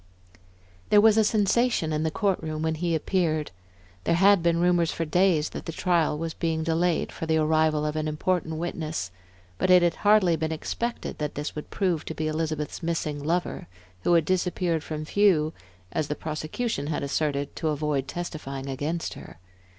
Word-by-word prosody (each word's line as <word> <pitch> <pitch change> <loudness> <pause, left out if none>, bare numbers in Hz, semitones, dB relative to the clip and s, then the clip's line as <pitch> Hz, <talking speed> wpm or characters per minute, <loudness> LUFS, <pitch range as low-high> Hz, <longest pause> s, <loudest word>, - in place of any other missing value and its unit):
There 210 - +6
was 215 0 +6
a 220 - +5
sensation 210 -4 +2
in 150 - 0
the 160 - +1
court 195 +3 0
room 155 -1 -4
when 160 0 +1
he 165 +1 -1
appeared. 160 -2 0 0.5
There 170 - +2
had 195 +1 +5
been 170 0 +2
rumors 175 -2 +3
for 165 - -2
days 170 -1 +2
that - - -7
the - - -2
trial 165 -3 +1
was 165 +1 -3
being 160 -1 -1
delayed 165 +1 +1
for 160 - -6
the 160 0 +2
arrival 155 -1 +2
of 150 0 -2
an 155 0 -1
important 160 +1 -1
witness, 160 - -3 0.5
but - - +1
it 180 -1 +7
had 170 -1 +1
hardly 205 -5 +4
been 160 0 -2
expected 235 +9 -4
that 150 -1 -3
this 145 +1 -4
would 150 - -6
prove 180 -6 0
to 160 - -5
be 155 - -2
Elizabeth's 155 0 -2
missing 155 -3 -2
lover, 170 +3 -1 0.3
who 175 - +2
had 165 -2 +3
disappeared 180 -2 0
from 155 -1 -5
view, 165 -5 +3 0.4
as 155 - -1
the 150 - -2
prosecution 155 - -3
had 150 -2 -2
asserted, 140 0 -1
to 160 - -1
avoid 150 -3 -1
testifying 140 -6 -5
against 145 +5 -3
her. - - -11
160 Hz, 180 wpm, -26 LUFS, 155-175 Hz, 0.5 s, it